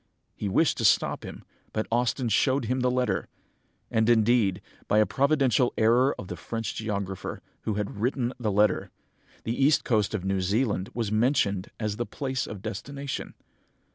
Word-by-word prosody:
He 105 - -3
wished 150 +10 +2
to - - -1
stop 95 - +3
him, - - -9 0.3
but 110 - -1
Austin 120 +2 +1
showed 130 +4 +2
him 125 +3 0
the 125 0 +2
letter!... 125 0 0 0.6
And 110 +1 +2
indeed, 110 -4 +3 0.3
by 105 - +2
a 110 - +6
providential 135 -4 +2
error 120 +5 +4
of 95 - -7
the - - -5
French 115 -1 -4
geographer, 100 -4 -4 0.3
who 110 - -1
had 105 -1 -3
written 125 0 0
the 110 -3 0
letter, 105 0 +2 0.5
the 120 +4 -1
east 145 +1 +4
coast 110 -2 +1
of 95 -3 -4
New 95 0 0
Zealand 100 0 0
was 115 -4 -1
mentioned 110 -4 +1
as 105 -2 -2
the 120 - -2
place 130 -2 -3
of 100 -2 -8
destination. 140 +5 -5
115 Hz, 170 wpm, -27 LUFS, 105-125 Hz, 0.6 s, a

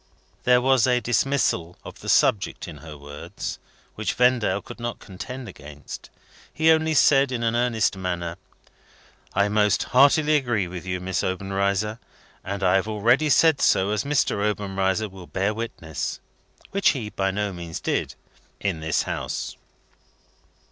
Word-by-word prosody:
There 125 0 +5
was 130 -1 +4
a 125 -1 +3
dismissal 120 -9 0
of - - -10
the - - -6
subject 100 -3 +2
in 80 -3 -9
her 75 0 -10
words, 75 +1 -7 0.3
which - - -2
Vendale 120 -6 +3
could - - -11
not 120 0 -4
contend 125 +7 -8
against. 75 0 -10 0.4
He 160 +1 +4
only 160 0 +2
said 140 -1 +5
in 120 -2 -2
an 115 0 +1
earnest 120 -4 +1
manner, 90 -2 -3 1.0
"I 100 +1 +3
most 105 -1 +2
heartily 150 +3 +4
agree 120 -9 0
with 90 +1 -8
you, 90 0 -2
Miss 90 +1 -2
Obenreizer, 100 +3 -1 0.4
and 100 +1 -4
I 95 +1 +4
have 95 - -1
already 115 +8 +2
said 160 +1 +4
so, 95 +2 +3
as 105 -1 0
Mr. 140 -7 +1
Obenreizer 100 -1 0
will 95 -3 -12
bear 100 +3 -1
witness," 80 - -5 0.5
which 200 0 +3
he 105 -4 -5
by 95 0 0
no 100 0 -2
means 85 -2 -6
did, - - -2 0.4
"in 95 -5 -1
this 80 0 0
house." - - -4
105 Hz, 150 wpm, -24 LUFS, 95-125 Hz, 1.0 s, There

